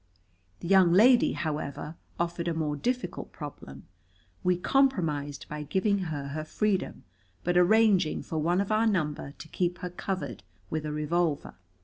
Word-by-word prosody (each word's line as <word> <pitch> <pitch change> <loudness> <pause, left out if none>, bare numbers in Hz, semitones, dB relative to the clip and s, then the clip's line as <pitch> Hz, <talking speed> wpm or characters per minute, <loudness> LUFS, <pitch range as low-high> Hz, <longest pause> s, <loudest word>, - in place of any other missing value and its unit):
The - - -5
young 190 -2 +6
lady, 235 +7 +6
however, 150 -1 -4 0.2
offered 170 0 -2
a 170 - 0
more 150 -2 -1
difficult 250 - -3
problem. 70 - -9 0.6
We 180 -1 +2
compromised 165 - +1
by 150 0 -5
giving 195 +7 +1
her 140 -3 -4
her 155 +2 -4
freedom, 195 +4 -1 0.4
but 175 0 0
arranging 190 -2 +4
for 160 - -3
one 175 +5 +2
of 200 - -3
our 220 +1 +3
number 155 -8 -1
to - - -10
keep 175 +1 -1
her 180 - -6
covered 165 - -4 0.3
with 155 -1 -2
a - - -3
revolver. 150 0 -1
170 Hz, 150 wpm, -28 LUFS, 150-190 Hz, 0.6 s, young